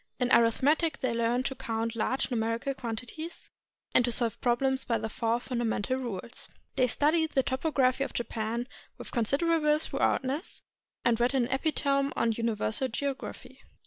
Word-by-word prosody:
In 250 0 +1
arithmetic 280 +8 +3
they 255 - +1
learned 235 +2 +1
to 270 - -1
count 230 -2 -3
large 255 +4 0
numerical 230 +3 0
quantities, 250 +7 -6 0.4
and - - +6
to 240 - 0
solve 230 -1 -1
problems 265 +2 +2
by 230 - 0
the 220 0 -4
four 230 +2 0
fundamental 240 -1 -1
rules. 235 -2 -6 0.3
They 255 -2 +3
studied 310 +6 +2
the 265 - +3
topography 265 -1 +1
of - - -4
Japan 235 0 -3 0.3
with - - -9
considerable 300 +6 +2
thoroughness, 290 0 -1 0.4
and 235 -1 +3
read 245 +3 +2
an 255 -3 +3
epitome 275 -1 +1
of 230 -1 +1
universal 230 +2 0
geography. 270 +3 -5
250 Hz, 145 wpm, -29 LUFS, 230-275 Hz, 0.4 s, and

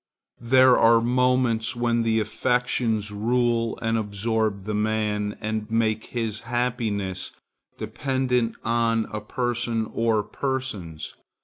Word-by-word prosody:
There 130 +1 +6
are 115 0 +6
moments 125 -1 +1
when 120 -1 +1
the 115 -1 +2
affections 115 -2 0
rule 115 +2 0
and 115 0 +1
absorb 105 -1 -1
the 105 +2 -4
man 105 -1 -1
and 110 0 -3
make 110 -1 0
his 115 -3 -3
happiness 115 -6 -2 0.5
dependent 130 -4 -1
on 115 -1 +1
a 105 - -3
person 120 -1 -2
or 115 -2 +1
persons. 105 - -4
115 Hz, 110 wpm, -24 LUFS, 110-120 Hz, 0.5 s, There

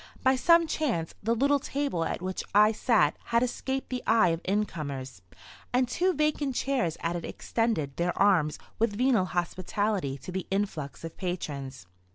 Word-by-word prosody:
By 260 0 +5
some 335 +5 +5
chance 260 - -1
the 230 +3 +1
little 280 +4 +3
table 275 -11 -2
at 175 - -3
which 185 0 -3
I 210 +1 +7
sat 210 - +2
had 235 +1 +2
escaped 265 +2 -3
the 250 -1 -2
eye 220 -6 +5
of 165 0 -1
incomers, 150 - -3 0.5
and 250 0 +2
two 360 +9 +1
vacant 300 -3 0
chairs 245 - 0
at 170 +1 -1
it 170 - -4
extended 215 - -2
their 175 +1 -1
arms 175 -7 +3 0.2
with 225 -2 +1
venal 245 -6 +3
hospitality 180 -2 -1
to 160 - -9
the 190 0 -4
influx 190 -9 -3
of 165 0 -7
patrons. 140 - -4
205 Hz, 165 wpm, -28 LUFS, 165-250 Hz, 0.5 s, I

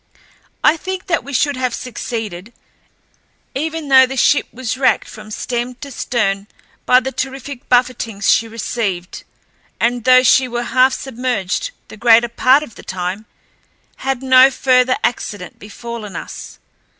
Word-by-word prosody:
I 310 +2 +5
think 375 +2 -5
that 330 - 0
we 280 - -9
should 285 +1 +1
have 255 -2 -2
succeeded, 225 -4 -6 1.0
even 320 +2 -3
though 260 -1 +7
the 265 +1 -6
ship 290 - +3
was 245 -2 -4
wracked 260 0 +1
from 215 -1 -11
stem 240 +3 -3
to 280 +2 -10
stern 200 -5 -1 0.4
by 250 0 +6
the 265 +1 -4
terrific 270 0 -6
buffetings 240 -5 +1
she 230 - +4
received, 215 -5 -4 0.6
and 240 0 0
though 255 0 +6
she 255 +1 +4
were 240 0 -3
half 260 +1 +3
submerged 250 - -2 0.2
the - - -12
greater 235 +1 +5
part 255 +5 +3
of 235 - -11
the - - -12
time, 185 +3 -4 0.7
had 270 -1 -3
no 260 0 +7
further 255 -1 +2
accident 205 -5 -3
befallen 215 -1 -8
us. - - -8
250 Hz, 145 wpm, -18 LUFS, 225-265 Hz, 1.0 s, though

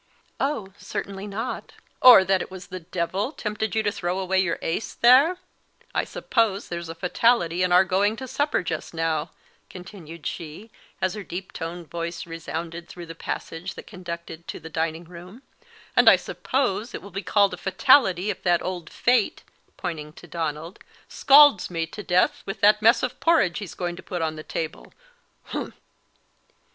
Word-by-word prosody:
"Oh, 245 -9 -2
certainly 200 0 -5
not." 225 +5 -5 0.3
"Or 250 -6 +10
that 190 0 +2
it - - -6
was 190 -1 -10
the 185 - -4
devil 180 - -2
tempted 215 -5 -3
you 220 - +2
to 205 - +1
throw 180 -2 -2
away 190 0 +1
your 185 -3 +1
ace 170 +7 -3
there? 270 +9 +6 0.6
I - - 0
suppose 215 -4 0
there's 170 -1 -5
a 165 - -6
fatality 180 0 +2
in 180 -1 +2
our 180 +1 +7
going 200 +3 +1
to 260 +3 -7
supper 285 0 0
just 165 0 -5
now," 160 -2 -1 0.4
continued 175 -4 -11
she, 170 +8 -6 0.3
as 185 - +1
her 210 - -6
deep 185 0 -7
toned 170 0 -6
voice 170 0 -4
resounded 165 +1 -6
through 175 -1 -9
the 165 - -8
passage 165 +2 -6
that - - -10
conducted 170 -2 -8
to - - -6
the 160 - -11
dining 160 +1 -2
room; 180 +8 -12 0.5
"and - - +8
I - - +8
suppose 245 -3 -2
it - - -7
will 200 - -11
be 195 +2 -4
called 200 +1 +2
a - - -5
fatality 195 -2 +3
if 190 - -8
that 175 -2 +2
old 180 -3 -5
Fate," 245 -3 +1 0.3
pointing 155 -4 -5
to - - -13
Donald, 165 0 -4 0.3
"scalds 280 -7 +6
me 165 -2 -2
to 185 +6 -9
death 180 -2 +2
with 195 - -5
that 210 +1 +5
mess 230 +3 +5
of 255 - -3
porridge 315 - +3
he's 205 -5 -8
going 175 -1 -3
to - - -9
put 175 -3 -4
on 155 -1 -2
the 155 - -7
table 160 0 -6 0.5
humph!" - - -5
185 Hz, 175 wpm, -24 LUFS, 170-210 Hz, 0.6 s, Or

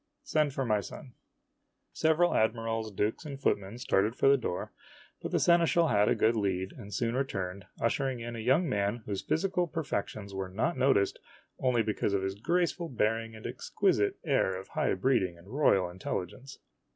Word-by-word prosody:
Send 150 -2 +1
for 135 0 -2
my 105 -3 +2
son." 125 +5 -10 0.8
Several 160 +2 +3
admirals, 115 0 0
dukes, 105 - -1
and 140 -3 -7
footmen 100 -4 -1
started 110 -2 +1
for 135 - +2
the 140 - +7
door, 90 -9 -4 0.5
but - - -4
the - - +2
seneschal 170 -1 +4
had 105 0 +3
a - - +3
good 115 +1 +3
lead, 95 -3 -1
and 105 -5 -11
soon 115 +3 -1
returned, 95 -8 -3
ushering 130 +1 0
in 120 0 -6
a - - -5
young 135 +10 +2
man 105 -1 -1
whose 100 -2 -3
physical 180 +1 0
perfections 105 -10 -4
were 95 -1 -4
not 110 - -1
noticed 130 -7 +2 0.4
only 125 -3 +2
because 105 -2 0
of 95 - 0
his 95 0 -1
graceful 170 - 0
bearing 115 -1 -1
and 110 - -11
exquisite 405 -4 0
air 115 - +1
of 95 - -12
high - - 0
breeding 95 -5 +1
and 85 +3 -16
royal 105 -8 +3
intelligence. 95 +8 -5
115 Hz, 175 wpm, -30 LUFS, 100-140 Hz, 0.8 s, the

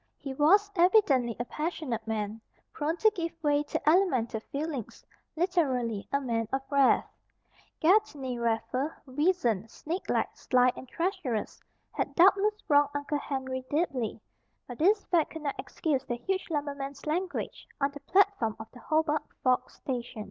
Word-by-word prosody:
He 275 -2 -6
was 395 +9 +4
evidently 340 - +4
a 240 - -1
passionate 290 -7 -3
man, 215 0 -3 0.3
prone 315 +3 -1
to 435 +3 +4
give 335 -5 -3
way 290 -1 +3
to 295 - -4
elemental 285 - +3
feelings, 280 0 -5 0.3
literally, 270 - 0
"a 280 - +2
man 230 -4 -1
of 270 0 -1
wrath." 280 -2 +4 0.7
Gedney 300 - +2
Raffer, 235 +5 -1
weazened, 260 - +1
snakelike, 335 - -2
sly, 250 -1 +3
and 260 - -9
treacherous, 330 - -2 0.3
had - - -3
doubtless 395 +4 +5
wronged 290 -1 +5
Uncle 285 +1 -1
Henry 260 -2 -4
deeply. 275 -9 -1 0.5
But 245 - -8
this 400 +6 +3
fact 335 -4 +2
could 320 -1 -7
not 280 - -3
excuse 285 -6 -1
the 240 - -3
huge 380 +9 -3
lumberman's 280 -2 -4
language 350 +4 -3
on 280 0 +1
the 285 - -9
platform 340 - +2
of 220 - -9
the 250 - -13
Hobart 310 +1 +1 0.2
Forks 255 -1 +1
station. 245 -4 -5
285 Hz, 145 wpm, -29 LUFS, 250-335 Hz, 0.7 s, doubtless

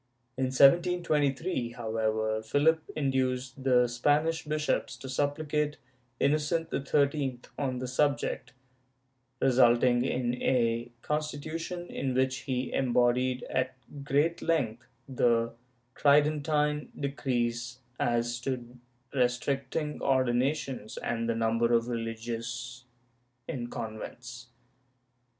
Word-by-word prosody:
In 130 - 0
1723, 145 -1 +3
however, 110 -1 -1
Philip 150 +8 +3
induced 130 -2 -1
the 125 -2 +4
Spanish 150 +7 +1
bishops 150 0 -1
to 135 - -9
supplicate 145 +2 -1 0.4
Innocent 155 +3 +1
XIII 140 -2 +1 0.2
on 130 -3 -1
the 130 0 -4
subject, 140 +3 0 0.9
resulting 120 -1 +4
in 125 -1 -1
a 120 -1 +1
constitution 155 +3 -3
in 135 -6 -3
which 130 0 +2
he 130 0 -1
embodied 125 0 +2
at 130 0 -1 0.3
great 145 +5 +1
length 120 -9 0 0.2
the 115 -3 +2 0.4
Tridentine 150 +1 +2
decrees 125 -3 -2 0.2
as 120 0 0
to 125 -1 -5 0.3
restricting 135 +4 -1
ordinations 130 -2 0
and 115 -1 -2
the 115 - +1
number 115 +1 +1
of 115 0 +3
religious 115 +1 -4 0.6
in 120 -3 -4
convents. 120 +2 -7
130 Hz, 95 wpm, -29 LUFS, 120-145 Hz, 0.9 s, the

